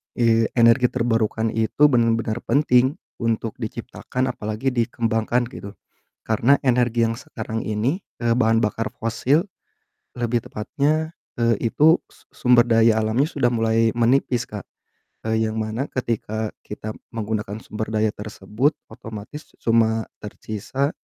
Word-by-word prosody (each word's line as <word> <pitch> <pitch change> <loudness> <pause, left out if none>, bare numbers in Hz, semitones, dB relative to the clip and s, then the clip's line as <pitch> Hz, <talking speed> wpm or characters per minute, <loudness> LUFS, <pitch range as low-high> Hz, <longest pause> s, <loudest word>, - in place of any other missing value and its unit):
eee, 115 -2 +3
energi 115 +1 +5
terbarukan 115 -2 0
itu 115 +6 0
bener-bener 115 -1 +1
penting 130 0 +3 0.2
untuk 115 -1 -1
diciptakan 130 +1 -3
apalagi 110 +4 -2
dikembangkan 115 0 0
gitu. 100 0 -8 0.5
Karena 115 +5 +3
energi 120 -2 +2
yang 115 - -2
sekarang 115 -6 -5
ini, 115 - 0 0.2
eee, 115 0 +3
bahan 115 -2 +3
bakar 110 +1 -1
fosil 125 +8 +1 0.8
lebih 120 -1 0
tepatnya, 150 +8 -1 0.3
eee, 115 -2 +3 0.2
itu 160 +3 +6
su - - -22
sumber 125 -2 +4
daya 115 -1 +4
alamnya 115 +6 +2
sudah 130 -6 +1
mulai 115 0 +2
menipis 120 0 +2
Kak. 105 -2 -7 0.6
Eee, 110 0 +1
yang 110 - -4
mana 110 +5 -2
ketika 110 -3 -2 0.2
kita 105 +1 -6 0.2
menggunakan 105 -2 -3
sumber 110 0 -5
daya 110 0 +2
tersebut, 105 +7 -1 0.2
otomatis 110 +7 -9
cuma 115 -1 +2 0.2
tersisa 110 +6 -3
115 Hz, 125 wpm, -22 LUFS, 110-125 Hz, 0.8 s, itu